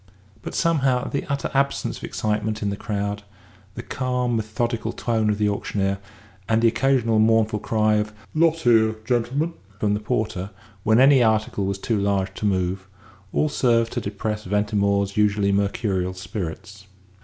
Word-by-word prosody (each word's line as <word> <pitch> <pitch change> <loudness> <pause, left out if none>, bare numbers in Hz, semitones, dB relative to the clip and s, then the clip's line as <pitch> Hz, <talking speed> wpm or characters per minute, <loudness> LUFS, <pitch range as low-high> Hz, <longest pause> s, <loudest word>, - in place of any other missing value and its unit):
But - - -6
somehow 135 -7 +2
the 140 - -3
utter 140 -1 -2
absence 140 0 0
of - - -16
excitement 110 0 -2
in 100 - 0
the - - -2
crowd, 100 0 -3 0.5
the - - -6
calm, 125 -2 -1
methodical 115 +1 -2
tone 110 -3 0
of 105 - +1
the 105 0 +1
auctioneer, 100 -1 -1 0.5
and 110 0 +3
the 115 - +4
occasional 120 -2 +2
mournful 110 -1 +3
cry 110 0 +2
of 105 0 -1 0.2
"Lot 160 0 +3
here, 110 -3 +4
gentlemen!" 130 +8 0 0.3
from 105 -2 +1
the 105 - 0
porter 105 -3 -2 0.3
when 110 +3 +3
any 135 0 +6
article 110 -3 +1
was 100 0 -2
too 110 +2 -1
large 100 -1 0
to 105 - -2
move, 95 -1 -1 0.4
all 155 - +1
served 115 -5 +1
to - - -2
depress 105 +1 -3
Ventimore's 100 0 0
usually 105 -1 +2
mercurial 100 -2 0
spirits. 95 +2 -7
110 Hz, 155 wpm, -23 LUFS, 100-115 Hz, 0.5 s, any